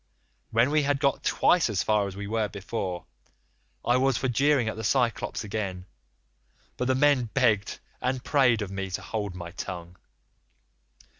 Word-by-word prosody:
When 115 +5 +3
we 155 0 +3
had 140 -1 +1
got 140 -2 +1
twice 175 -7 +3
as 100 -4 0
far 105 -2 +2
as 95 - -7
we 100 +1 -5
were 110 +1 0
before, 95 -3 -4 0.8
I 120 - +4
was 135 -1 +2
for 130 - -1
jeering 135 0 +2
at 110 - -2
the 110 - -6
Cyclops 120 0 0
again, 100 -4 -4 0.9
but 125 - -2
the 130 +1 +2
men 140 -2 +3
begged 110 -7 +2 0.2
and 125 0 -1
prayed 125 -7 +3
of 95 - -7
me 95 0 -4
to 90 - -4
hold 105 -4 -4
my 85 -1 -7
tongue. 90 -1 -7
110 Hz, 165 wpm, -27 LUFS, 100-130 Hz, 0.9 s, I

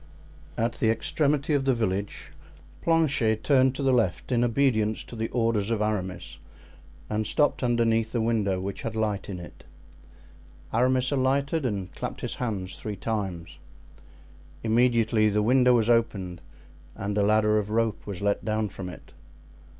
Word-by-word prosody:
At 115 0 0
the 110 - +2
extremity 145 +5 +1
of 140 -2 +1
the 135 -2 +3
village 100 -3 -3 0.5
Planchet 140 -10 +2
turned 130 -2 +3
to 140 - -3
the 135 -1 +3
left 115 -2 0
in 120 -1 +2
obedience 115 -4 +1
to - - -11
the 110 0 -2
orders 115 -4 0
of 115 -2 0
Aramis, 95 -5 -3 0.7
and 105 0 -2
stopped 145 -2 +1
underneath 115 -2 +1
the 120 - -1
window 110 -4 +1
which 95 +1 -5
had 115 -1 -4
light 105 -3 -2
in 95 -3 -5
it. 85 - -12 1.1
Aramis 130 +2 +2
alighted 140 +2 +1
and 100 -5 -4
clapped - - -6
his - - -3
hands 95 -7 -4
three 105 -1 -5
times. 95 -5 -4 1.0
Immediately 115 -1 +3
the 105 0 +1
window 125 +2 +4
was 115 -2 +2
opened 100 -7 0 0.5
and 100 +1 -3
a 105 - +2
ladder 105 +1 +3
of 105 0 -4
rope 115 -1 -1
was 100 -1 -5
let 100 0 0
down 110 -1 -1
from 95 -2 -7
it. 90 - -12
110 Hz, 155 wpm, -26 LUFS, 105-125 Hz, 1.1 s, window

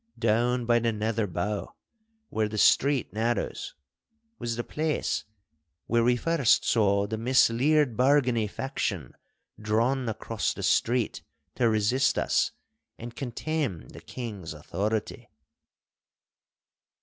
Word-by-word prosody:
Down 120 +2 +1
by 120 0 +3
the 115 0 0
Nether 110 0 -1
Bow, 100 +4 -3 0.5
where 110 -1 0
the 110 - -5
street 135 +1 +3
narrows, 115 +3 -2 0.6
was 115 -1 -2
the 120 - -3
place 155 +3 -2 0.6
where 115 0 +2
we 120 +1 +3
first 140 -1 +2
saw 100 -3 +2
the 110 +1 -4
misleared 130 +3 +3
Bargany 125 -4 +2
faction 100 - -3 0.5
drawn 115 +4 +1
across 110 0 -2
the - - -6
street 120 -1 +1 0.3
to 120 -2 +2
resist 110 +5 +2
us - - +1 0.5
and 120 0 -9
contemn 125 - -3
the - - -12
King's 105 -10 -7
authority. 100 +8 -3
115 Hz, 115 wpm, -27 LUFS, 105-125 Hz, 0.6 s, by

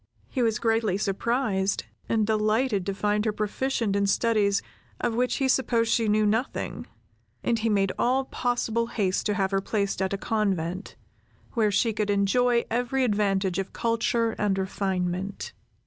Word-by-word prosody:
He 255 - -2
was 225 -2 +2
greatly 225 -4 +1
surprised, 205 -1 0 0.3
and 220 -2 +2
delighted 215 -1 +1
to 195 - 0
find 210 +1 +1
her 215 - +1
proficient 215 +1 -1
in 200 0 +2
studies 200 -1 +2 0.4
of 235 - 0
which 245 +1 +1
he 270 - +1
supposed 235 -3 +2
she 225 -2 +2
knew 215 0 +3
nothing, 225 +5 -1 0.6
and 230 -1 +1
he 225 +1 0
made 195 -2 +2
all 260 +2 +2
possible 235 -2 -1
haste 195 -5 0
to 210 - 0
have 195 -1 0
her 195 0 +1
placed 200 -1 -1
at 190 - 0
a 200 - -1
convent, 195 -4 -2 0.6
where 220 -4 +2
she 225 +3 +1
could 210 -1 -1
enjoy 235 +5 +2
every 245 +3 0
advantage 195 -4 +1
of 195 - -4
culture 230 0 +1
and 200 -2 +1
refinement. 190 0 -2
215 Hz, 160 wpm, -26 LUFS, 195-230 Hz, 0.6 s, knew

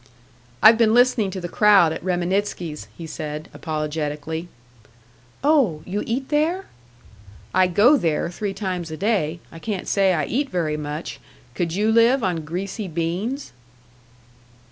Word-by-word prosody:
"I've 225 +1 +8
been 225 -1 +4
listening 245 -4 +4
to 190 0 -5
the 175 - -4
crowd 195 -4 +5
at 160 - -7
Reminitsky's," 180 - -2
he 165 - -7
said, 155 0 -6
apologetically. 155 +1 -4 1.0
"Oh! 265 - +3
You 200 +3 -3
eat 260 +4 -2
there?" 320 +6 +1 0.9
"I 185 0 +4
go 215 - +5
there 170 - -1
three 195 +2 -4
times 185 -4 -3
a 155 - -6
day. 175 -6 0
I 165 - -10
can't 205 0 -4
say 195 -2 +3
I 155 -3 0
eat 275 - -1
very 165 -6 -1
much. 150 +1 -5 0.3
Could 170 +4 -2
you 210 +3 +2
live 230 +3 +4
on 175 -4 -1
greasy 190 +5 -4
beans?" 180 - -3
185 Hz, 145 wpm, -22 LUFS, 160-220 Hz, 1.0 s, I've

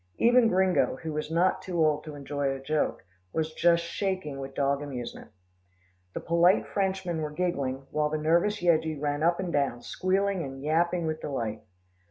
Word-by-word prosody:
Even 240 0 +5
Gringo, 190 -2 +2
who 160 -1 -3
was 150 0 -3
not 170 +3 +2
too 180 -2 -4
old 155 -2 +2
to 155 -2 -7
enjoy 145 0 -2
a 135 0 -3
joke, 145 -7 -1 0.3
was 160 0 -1
just 170 +1 +3
shaking 180 -5 -3
with 135 0 -7
dog 140 0 +1
amusement. 130 -5 -6 0.9
The - - -1
polite 170 +3 +3
Frenchmen 190 -4 -1
were 155 - -2
giggling, 140 -5 -2
while 150 0 +1
the 155 - -1
nervous 170 +6 +1
Yeggie 160 -3 +2
ran 145 0 -1
up 170 +2 +2
and 180 -2 -3
down, 140 -4 0
squealing 195 0 0
and 135 -2 -7
yapping 170 +3 +1
with 155 0 -3
delight. 115 -6 -3
155 Hz, 175 wpm, -28 LUFS, 145-175 Hz, 0.9 s, Even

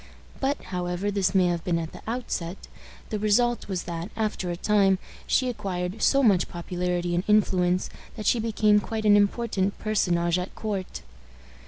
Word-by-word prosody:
But, 275 +1 0
however 180 +3 -1
this 195 -2 0
may 185 -1 +5
have 175 -2 0
been 175 -2 0
at 165 -1 -4
the - - -11
outset, 210 -7 -3 0.5
the 215 - -1
result 235 +3 +2
was 190 -3 -3
that, 170 +2 -5
after 215 -4 -2
a 175 - -2
time, 195 -1 +3 0.3
she 260 - +2
acquired 190 -3 -3
so 275 0 +4
much 195 -7 +3
popularity 175 0 -2
and 175 +1 +1
influence 185 -4 +2 0.3
that 215 - -6
she 235 - +3
became 215 -2 +3
quite 220 +1 -4
an 205 -1 +7
important 205 -1 +1
personage 175 -5 +1
at 180 - -6
court. 200 -4 -4
195 Hz, 165 wpm, -26 LUFS, 180-215 Hz, 0.5 s, an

